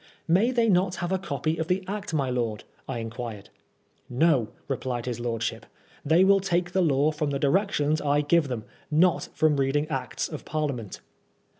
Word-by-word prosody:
May 190 +8 +4
they 235 -3 +2
not 185 -2 +2
have 175 +1 -3
a 190 - +1
copy 155 -2 -2
of 160 - -1
the 185 +2 0
Act, 205 0 -4
my 140 -5 0
lord? 115 -4 -2
" - - -34
I - - -2
in 115 -1 -5
quired. 115 -4 -7 0.6
"No," 130 -3 +3 0.2
replied 125 -3 -3
his 120 -2 -3
lordship, 115 -2 -3 0.4
"they 160 +5 +4
will 195 +1 +5
take 175 -2 0
^e 180 -3 +2
law 140 +2 +3
from 150 -1 -2
the 140 - -1
directions 155 0 +1
I 145 0 +2
give 155 +1 +3
them; 120 -5 -4 0.3
not 170 +3 +2
from 155 -2 +3
reading 140 +2 +1
Acts 130 -5 -3
of 155 - -7
Parliament." 140 -9 -3
150 Hz, 185 wpm, -26 LUFS, 125-175 Hz, 0.6 s, will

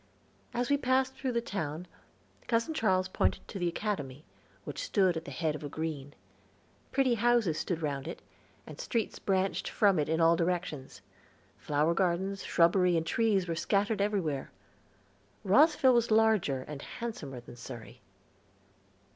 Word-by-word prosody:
As 245 +2 -1
we 285 - +5
passed 260 0 +1
through 260 -2 -3
the 235 - +1
town, 165 -6 -4 0.6
Cousin 230 +6 +1
Charles 185 -10 +1
pointed 95 0 -1
to 195 - -6
the 175 - 0
Academy, 160 -7 -3 0.4
which - - -6
stood 195 - +2
at 160 0 -5
the - - -7
head 160 -3 -1
of 150 - -7
a 145 - -4
green. 150 -3 -5 0.8
Pretty 265 -2 +2
houses 230 -8 +2
stood 165 0 -3
round 140 -2 -2
it, - - -6 0.5
and - - -11
streets 230 -3 -2
branched 190 0 0
from 200 -6 +3
it 150 - 0
in 160 +1 +1
all 165 0 +5
directions. 165 - -3 0.6
Flower 150 +3 +1
gardens, 190 +2 0
shrubbery, 175 +1 +3
and 165 - -1
trees 195 +1 +1
were 170 - -1
scattered 200 +5 0
everywhere. 185 -10 -1 0.9
Rosville 275 - +5
was 235 -1 +2
larger 215 -12 +3
and 145 0 -8
handsomer 160 - -6
than 120 0 -12
Surrey. 120 0 -10
180 Hz, 150 wpm, -30 LUFS, 155-225 Hz, 0.9 s, we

